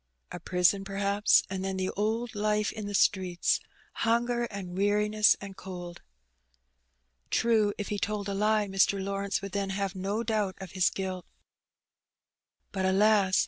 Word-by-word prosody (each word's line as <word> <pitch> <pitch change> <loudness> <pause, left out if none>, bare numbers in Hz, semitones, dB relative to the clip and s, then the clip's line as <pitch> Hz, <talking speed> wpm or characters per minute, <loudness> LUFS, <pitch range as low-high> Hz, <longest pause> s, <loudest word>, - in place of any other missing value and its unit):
A - - -6
prison, 180 +2 +2
perhaps, 200 +1 +2
and 190 0 -4
then 190 0 -2
the 185 0 -1
old 225 +3 -2
life 210 0 0
in 215 -2 -6
the 205 - -3
streets 185 -3 +2 0.2
— - - -25
^hunger 235 +1 +1
and 185 -3 -7
weariness 210 +2 +3
and 200 -1 -9
cold. 175 -2 -8 1.3
True, 220 -3 +2
if 205 - -4
he 205 - -2
told 210 -1 -2
a 200 - -2
lie 210 +1 +2
Mr. 195 +1 +2
Lawrence 195 +1 -2
would 200 - -5
then 200 0 -2
have 195 0 -2
no 200 +4 -2
doubt 210 -4 -1
of 190 -2 -8
his 185 -2 +2
guilt. 185 -2 -5 1.4
But, 190 -1 -2
alas! 195 0 +3
200 Hz, 155 wpm, -28 LUFS, 190-210 Hz, 1.4 s, weariness